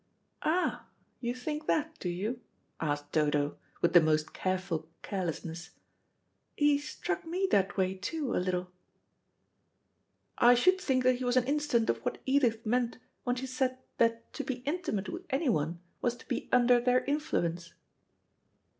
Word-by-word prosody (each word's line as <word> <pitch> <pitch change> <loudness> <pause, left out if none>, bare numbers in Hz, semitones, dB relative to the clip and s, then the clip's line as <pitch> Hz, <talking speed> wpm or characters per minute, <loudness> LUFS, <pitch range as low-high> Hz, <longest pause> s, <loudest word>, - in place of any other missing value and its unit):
"Ah, 350 +4 0 0.3
you 240 0 -2
think 300 +4 -4
that, 315 +1 0
do 180 - -2
you?" 210 +8 -3 0.4
asked 145 -2 -2
Dodo, 150 -1 +1 0.2
with 170 - +3
the 175 - +9
most 155 -1 +1
careful 185 -4 -2
carelessness. 170 -3 -4 0.9
"He 290 -1 +4
struck 180 -11 -3
me 360 +4 0
that 195 0 +2
way, 190 -1 +2
too, 255 - -3
a - - +2
little." 180 -1 -2 1.7
"I 245 +1 +7
should 370 +10 +4
think 255 -6 +1
he 255 0 +3
was 245 0 +2
an 255 - +5
instance 285 -5 +1
of 115 - -5
what - - -3
Edith 245 -5 +2
meant 240 +1 +1 0.3
when 245 -1 +1
she 255 +1 -4
said 255 0 -1 0.2
that 230 0 +1
to - - -3
be 250 -2 -4
intimate 290 - -1
with 360 +2 -7
anyone 175 - 0 0.2
was 240 -1 +1
to 240 - -16
be - - -3
under 245 0 +5
their 250 +1 +3
influence." 175 - -1
240 Hz, 150 wpm, -31 LUFS, 180-270 Hz, 1.7 s, the